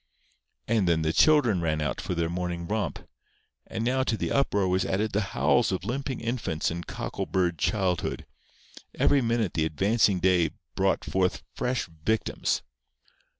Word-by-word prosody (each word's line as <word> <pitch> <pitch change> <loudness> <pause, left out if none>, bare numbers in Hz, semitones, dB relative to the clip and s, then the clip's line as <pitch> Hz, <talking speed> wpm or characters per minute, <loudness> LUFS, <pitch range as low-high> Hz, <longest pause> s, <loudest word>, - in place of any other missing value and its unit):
And 110 -5 +2
then 80 -2 +2
the 80 +1 +1
children 130 - +4
ran 80 -2 0
out 75 -4 -2
for 90 - -3
their 85 -1 0
morning 85 0 -3
romp. 105 -6 -3 0.6
And 110 - -3
now 130 +2 +2
to 115 - 0
the - - -2
uproar 100 -8 +2
was 90 0 +1
added 105 +3 -1
the 105 - +1 0.2
howls - - +3
of 95 0 -3
limping 130 +3 -3
infants 115 -11 -1
and 85 +1 -5
cockleburred 90 -3 -2
childhood. 95 -5 0 0.7
Every 140 - +3
minute 115 -5 0
the 80 - +1
advancing 100 +5 +2
day 90 -2 +3 0.2
brought 95 0 +1
forth 95 -1 0
fresh 125 0 -1 0.2
victims. 110 +5 0
95 Hz, 150 wpm, -27 LUFS, 85-115 Hz, 0.7 s, children